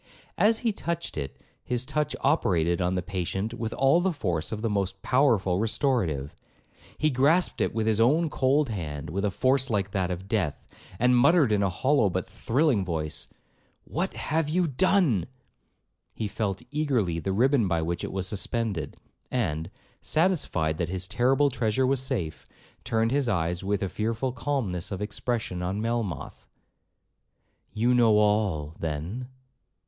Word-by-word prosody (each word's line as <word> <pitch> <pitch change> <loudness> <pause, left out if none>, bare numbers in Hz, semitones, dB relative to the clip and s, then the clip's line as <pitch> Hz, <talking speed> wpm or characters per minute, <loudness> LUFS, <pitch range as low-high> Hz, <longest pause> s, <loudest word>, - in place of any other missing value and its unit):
As 220 +2 +4
he 230 - +4
touched 170 -4 -4
it, 70 -3 -5 0.2
his 125 0 -2
touch 150 +2 -1
operated 90 - +2
on 90 +1 +1
the 90 - -1
patient 95 +3 -3
with 115 -2 -4
all 135 +6 +4
the 190 +1 +1
force 90 - -2
of 110 0 -4
the - - +2
most 100 -1 -2
powerful 115 -9 +2
restorative. 105 - 0 0.6
He 155 0 +2
grasped 145 +8 +2
it - - +1
with 110 -1 0
his 110 -1 +2
own 150 +9 +4
cold 140 -1 +2
hand 75 -7 -5
with 100 +3 -2
a 105 - +2
force 130 +6 +1
like 100 -3 0
that 95 -2 0
of 90 +1 -5
death, 100 -9 -1 0.3
and 125 +3 +4
muttered 145 0 +5
in 105 -1 +2
a 100 - +2
hollow 130 +4 +2
but 95 0 -2
thrilling 130 -4 +1
voice, 80 -4 -3 0.6
'What - - -3
have 155 0 -1
you 180 +3 +2
done?' 150 - +2 0.9
He 110 - -2
felt 100 -2 -3
eagerly 125 - 0
the 95 +4 -2
ribbon 120 +2 +3
by 85 -3 0
which 85 +1 -2
it - - -4
was 95 -1 -2
suspended, 105 -3 -2 0.3
and, 80 +2 -1 0.3
satisfied 155 - +1
that 85 -1 -1
his 95 0 -3
terrible 135 +5 +2
treasure 120 0 +1
was 130 0 +2
safe, 105 - -3 0.4
turned 115 0 +1
his 140 -3 +1
eyes 90 -3 -1
with 100 0 0
a - - 0
fearful 115 +6 -2
calmness 115 -9 -2
of 95 - -3
expression 105 -2 -3
on 95 +3 -2
Melmoth, 115 -5 -3 1.2
'You 120 +3 +2
know 115 -3 +5
all, 105 -8 +1
then?' 85 +11 -4
110 Hz, 160 wpm, -27 LUFS, 90-130 Hz, 1.2 s, muttered